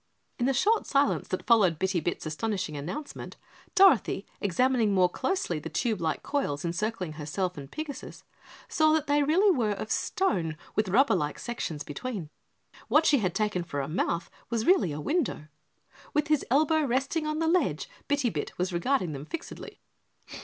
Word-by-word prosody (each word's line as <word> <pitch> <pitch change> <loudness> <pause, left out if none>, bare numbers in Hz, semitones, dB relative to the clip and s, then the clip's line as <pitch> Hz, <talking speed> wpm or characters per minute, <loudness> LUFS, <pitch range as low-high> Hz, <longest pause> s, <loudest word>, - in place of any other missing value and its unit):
In 245 - +2
the 270 - +2
short 425 - +2
silence 280 0 +2
that 185 - -3
followed 200 -9 +4
Bitty 190 +1 0
Bit's 170 +2 -3
astonishing 185 0 -2
announcement, 180 - -6 0.4
Dorothy, 360 - +5
examining 225 +1 +2
more 180 -1 +4
closely 180 - -1
the - - -7
tube 220 -7 -1
like 160 -1 -1
coils 175 - -2
encircling 180 0 -2
herself 170 +5 -3
and 140 -3 -9
Pigasus, 305 -3 -7 0.4
saw 310 -2 +3
that 315 -2 +1
they 290 0 +2
really 355 +7 +4
were 220 -4 +1
of 215 +2 -6
stone 170 - 0 0.2
with 215 -1 +1
rubber 265 +9 +4
like 150 0 -1
sections 165 -11 -4
between. 170 - -5 0.6
What 315 +1 +4
she 285 - +5
had 185 -5 -1
taken 210 -4 0
for 145 -4 -4
a 135 - -2
mouth 170 +1 -1 0.2
was 230 -1 -1
really 355 - +4
a 145 - -4
window. 255 - -1 0.7
With 300 0 +1
his 305 -2 +3
elbow 310 +4 +3
resting 275 +4 0
on 305 0 -1
the 325 - 0
ledge, 355 +2 +1 0.2
Bitty 285 -5 +1
Bit 150 - -5
was 180 +1 -1
regarding 185 - +1
them 140 0 -6
fixedly. 335 - -8
220 Hz, 170 wpm, -28 LUFS, -, 0.7 s, Dorothy